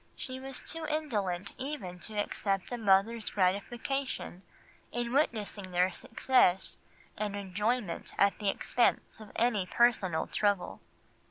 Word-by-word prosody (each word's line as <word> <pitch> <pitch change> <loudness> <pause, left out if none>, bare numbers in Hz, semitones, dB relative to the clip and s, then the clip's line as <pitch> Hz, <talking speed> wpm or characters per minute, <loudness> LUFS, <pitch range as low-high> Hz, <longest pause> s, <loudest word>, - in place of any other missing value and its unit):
She 260 0 -6
was 270 0 -6
too 325 -1 -4
indolent 205 - -1
even 250 -11 -5
to 215 +3 -7
accept 195 -1 -1
a 245 - -2
mother's 215 +2 +3
gratification 205 +3 -1 0.5
in 240 0 -2
witnessing 215 -8 0
their 180 +1 +2
success 195 -1 +2 0.4
and 210 -1 -2
enjoyment 205 +1 -1
at 200 0 +3
the 205 -2 +1
expense 235 +3 +1
of 210 - -11
any 220 -5 +2
personal 200 -6 +3
trouble." 205 -3 0
210 Hz, 120 wpm, -31 LUFS, 190-245 Hz, 0.5 s, mother's